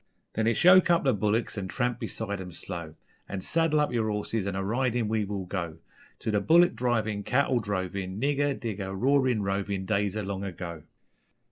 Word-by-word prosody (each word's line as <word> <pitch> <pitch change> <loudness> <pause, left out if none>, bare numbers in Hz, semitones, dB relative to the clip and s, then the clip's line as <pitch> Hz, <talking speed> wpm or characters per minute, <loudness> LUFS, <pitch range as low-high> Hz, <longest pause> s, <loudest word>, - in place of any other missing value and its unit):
_Then 110 0 0
it's 115 - +1
yoke 185 0 +7
up 170 -1 +4
the 135 - +3
bullicks 105 +1 0
and 95 -1 -5
tramp 120 0 -1
beside 100 -3 -4
'em 90 -1 -7
slow, 85 -3 -7 0.3
An' 95 -1 -4
saddle 165 - +2
up 150 -4 +1
yer 110 -2 +1
horses 105 0 -2
an' 100 - -2
a 95 - -1
ridin' 120 +2 0
we 110 -1 0
will 100 -2 -4
go, 85 -4 -4 0.4
To 110 - -1
the 105 -1 +1
bullick 170 - +5
drivin', 110 -4 0
cattle 125 +3 +2
drovin', 95 -2 -3
Nigger, 145 +1 +1
digger, 100 -5 -4
roarin', 130 0 +2
rovin' 100 0 -2
Days 100 0 0
o' 105 - -2
long 95 0 -4
ago. 85 -4 -6
105 Hz, 190 wpm, -28 LUFS, 95-125 Hz, 0.4 s, yoke